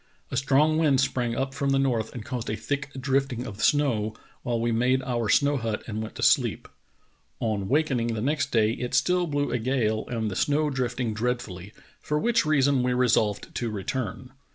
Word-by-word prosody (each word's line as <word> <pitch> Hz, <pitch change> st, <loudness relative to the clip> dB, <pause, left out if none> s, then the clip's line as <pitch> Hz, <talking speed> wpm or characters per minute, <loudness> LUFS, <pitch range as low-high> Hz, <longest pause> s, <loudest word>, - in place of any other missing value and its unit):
A -, -, -3 dB
strong 145 Hz, +4 st, +3 dB
wind 145 Hz, -5 st, +3 dB
sprang 125 Hz, -3 st, 0 dB
up 135 Hz, +1 st, -2 dB
from 140 Hz, 0 st, -1 dB
the 135 Hz, -, +3 dB
north 125 Hz, -5 st, 0 dB
and 115 Hz, -3 st, -6 dB
caused 125 Hz, -3 st, -4 dB
a 105 Hz, -, -1 dB
thick 145 Hz, +4 st, -3 dB
drifting 130 Hz, -2 st, 0 dB
of 105 Hz, -1 st, -7 dB
snow, 115 Hz, -8 st, +2 dB, 0.3 s
while 120 Hz, -3 st, -1 dB
we 115 Hz, +1 st, 0 dB
made 125 Hz, +3 st, +2 dB
our 120 Hz, -4 st, -1 dB
snow 140 Hz, +6 st, +3 dB
hut 115 Hz, -3 st, -3 dB
and 110 Hz, -1 st, -4 dB
went 110 Hz, -, -7 dB
to -, -, -4 dB
sleep. -, -, +2 dB, 0.7 s
On 105 Hz, -4 st, -1 dB
wakening 130 Hz, -5 st, +1 dB
the -, -, -3 dB
next 145 Hz, +4 st, 0 dB
day 110 Hz, -2 st, +3 dB
it 125 Hz, +1 st, -3 dB
still 180 Hz, +8 st, +2 dB
blew 145 Hz, -3 st, -1 dB
a 125 Hz, -, 0 dB
gale 110 Hz, -3 st, 0 dB
and 110 Hz, -3 st, -2 dB
the -, -, -5 dB
snow 150 Hz, +5 st, +1 dB
drifting 125 Hz, -3 st, -2 dB
dreadfully, 105 Hz, -5 st, -3 dB, 0.3 s
for 150 Hz, -, -2 dB
which 230 Hz, +1 st, +2 dB
reason 140 Hz, -3 st, +3 dB
we 125 Hz, 0 st, +1 dB
resolved 115 Hz, -4 st, +1 dB
to 120 Hz, -, -2 dB
return. 115 Hz, +4 st, -4 dB
125 Hz, 195 wpm, -26 LUFS, 115-140 Hz, 0.7 s, strong